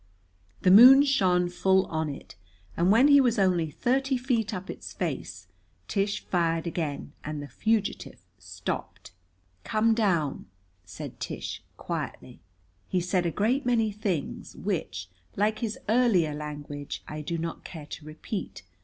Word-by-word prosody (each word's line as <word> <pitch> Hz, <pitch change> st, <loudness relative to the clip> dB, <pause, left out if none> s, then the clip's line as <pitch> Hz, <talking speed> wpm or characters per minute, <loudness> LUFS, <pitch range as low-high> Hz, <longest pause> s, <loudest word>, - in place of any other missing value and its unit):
The 180 Hz, -, +5 dB
moon 255 Hz, +7 st, +10 dB
shone 185 Hz, -10 st, +2 dB
full 190 Hz, +2 st, +2 dB
on 160 Hz, -1 st, -2 dB
it, 140 Hz, -, -9 dB, 0.4 s
and 175 Hz, +3 st, +3 dB
when 240 Hz, +6 st, +6 dB
he 285 Hz, -1 st, +7 dB
was 245 Hz, -2 st, +2 dB
only 180 Hz, -5 st, +2 dB
thirty 265 Hz, -, 0 dB
feet 245 Hz, -4 st, 0 dB
up 190 Hz, -2 st, -5 dB
its -, -, -8 dB
face -, -, -4 dB, 0.4 s
Tish 200 Hz, 0 st, -1 dB
fired 165 Hz, -2 st, 0 dB
again, 160 Hz, -4 st, -4 dB
and 150 Hz, 0 st, -4 dB
the 145 Hz, -, -6 dB
fugitive 220 Hz, +5 st, -1 dB, 0.2 s
stopped. -, -, -6 dB, 0.5 s
"Come 220 Hz, +1 st, +2 dB
down," 175 Hz, -, 0 dB, 0.4 s
said 90 Hz, 0 st, -9 dB
Tish -, -, -5 dB, 0.2 s
quietly. -, -, -5 dB, 0.5 s
He 185 Hz, -, +1 dB
said 180 Hz, 0 st, 0 dB
a -, -, -1 dB
great 235 Hz, -, +1 dB
many 230 Hz, -3 st, +2 dB
things 200 Hz, -, -3 dB
which, 95 Hz, -, -3 dB, 0.3 s
like 215 Hz, +2 st, +1 dB
his 225 Hz, -3 st, -3 dB
earlier 210 Hz, -9 st, +3 dB
language, 145 Hz, -1 st, -6 dB
I 150 Hz, 0 st, -5 dB
do 170 Hz, +3 st, -3 dB
not 165 Hz, 0 st, -5 dB
care 160 Hz, -4 st, -9 dB
to 150 Hz, -, -9 dB
repeat. 155 Hz, -, -6 dB
185 Hz, 145 wpm, -27 LUFS, 160-225 Hz, 0.5 s, moon